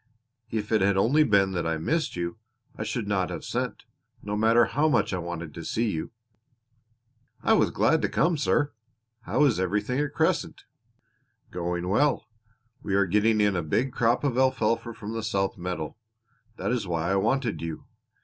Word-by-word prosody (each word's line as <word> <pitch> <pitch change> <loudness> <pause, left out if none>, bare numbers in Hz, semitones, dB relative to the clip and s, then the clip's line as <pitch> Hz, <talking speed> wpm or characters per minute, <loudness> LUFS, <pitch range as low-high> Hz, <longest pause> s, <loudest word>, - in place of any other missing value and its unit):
If 110 -2 -3
it 110 - +3
had 100 0 +3
only 135 +10 +4
been 100 -7 +3
that 85 -3 -2
I 80 0 0
missed 160 - -1
you 85 +1 -3 0.4
I - - -8
should 115 -5 -3
not 95 -3 0
have - - -6
sent, - - -3 0.4
no 105 0 -3
matter 115 +2 +4
how 155 +2 +1
much 145 - +1
I 90 - -1
wanted 85 -2 -6
to 85 - -7
see 115 +5 0
you." 80 - -4 1.3
"I - - +4
was - - +4
glad - - +2
to - - 0
come, 170 +1 +2
sir. 145 0 +1 0.5
How 150 - +3
is 120 -9 +2
everything 105 +8 0
at 150 -1 -2
Crescent?" - - 0 0.9
"Going 90 0 -3
well. 135 +8 +2 0.6
We 95 - -1
are 100 0 +4
getting 105 +4 +2
in 105 -2 +3
a 90 - 0
big 115 - 0
crop 120 +3 +2
of 130 -3 +1
alfalfa 115 -3 +1
from 110 -1 -6
the 115 - -3
south 100 -3 -1
meadow. 90 -4 -4 0.6
That - - -2
is 120 -6 -1
why 85 +1 -1
I - - +2
wanted 115 +3 0
you. 80 -1 -5
105 Hz, 180 wpm, -26 LUFS, 90-120 Hz, 1.3 s, only